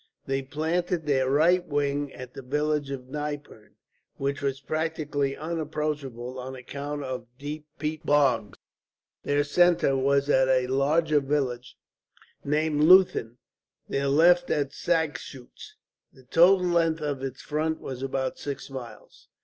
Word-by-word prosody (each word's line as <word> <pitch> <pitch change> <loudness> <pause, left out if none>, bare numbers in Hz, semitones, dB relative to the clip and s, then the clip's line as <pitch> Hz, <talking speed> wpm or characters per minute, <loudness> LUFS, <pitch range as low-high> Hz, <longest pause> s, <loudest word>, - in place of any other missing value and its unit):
They 135 0 -1
planted 160 +4 -2
their 130 -3 +2
right 170 +6 +4
wing 145 -2 -1
at 125 -1 -10
the - - -8
village 150 +2 -1
of 130 -2 -6
Nypern, 145 -6 -6 0.4
which 140 +1 -2
was 135 -1 -1
practically 150 -2 -2
unapproachable 150 -6 -4
on 130 +1 -6
account 140 +3 -6
of 130 -2 -5
deep 150 +2 -7
peat 155 0 -3
bogs. 135 -9 +2 0.6
Their 145 0 +1
centre 170 -1 +3
was 140 +1 +2
at 130 -2 +4
a 130 -1 +3
larger 150 +4 +2
village 135 -3 -2 0.7
named 150 +1 0
Leuthen, 180 -10 +5 0.5
their 140 0 -1
left 175 +5 +4
at 140 -2 0
Sagschuetz. 150 -7 -3 0.4
The 130 - -19
total 180 +7 +5
length 165 -2 +1
of 145 -3 -2
its 135 -1 -6
front 155 +1 -1
was 130 -1 -7
about 135 -1 -2
six 140 -1 -6
miles. 125 -3 -10
145 Hz, 135 wpm, -26 LUFS, 135-155 Hz, 0.7 s, Leuthen